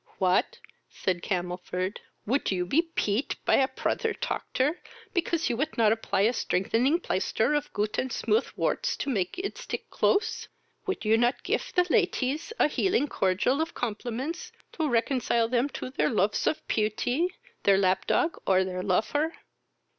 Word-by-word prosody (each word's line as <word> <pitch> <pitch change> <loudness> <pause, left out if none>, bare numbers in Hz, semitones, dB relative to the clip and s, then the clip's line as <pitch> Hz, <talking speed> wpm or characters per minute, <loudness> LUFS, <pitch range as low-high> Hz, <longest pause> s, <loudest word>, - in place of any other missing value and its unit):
"What! 185 -1 +2 0.3
(said 180 -2 -2
Camelford,) 180 +1 -3 0.3
would 265 +6 +1
you 180 -2 0
be 280 - +3
peat 265 -8 -1
py - - +4
a 265 - +3
prother 445 - -1
toctor, 305 - -1 0.4
because 335 -3 0
you 240 - 0
would 300 +5 -2
not 220 -2 +5
apply 225 -3 0
a 220 +4 +4
strengthening 240 - +1
plaister 220 - 0
of 295 -1 -1
goot 210 +1 -1
and 260 - -2
smooth 430 - +1
worts - - 0
to 280 - -2
make 190 - -1
it 395 +6 -4
stick - - -6
close? 415 +2 +1 0.4
would 385 - -2
you 220 +1 +4
not 240 +2 +1
gif - - -1
the 360 -1 +3
laties 285 - +1
a - - +4
healing 370 -1 +1
cordial 205 +10 +1
of 325 - -3
compliments 250 - -4 0.3
ro 315 - +2
reconcile 235 -2 +1
them 250 +3 +1
to 255 - -6
their - - +1
lofs 210 -2 +1
of 310 - -1
peauty, 240 - +1 0.3
their 195 -1 +5
lap 190 -1 +2
dog, 335 - +1
or 190 -1 +4
their 185 -1 -3
lofer? 220 - +1
245 Hz, 160 wpm, -28 LUFS, 200-310 Hz, 0.4 s, not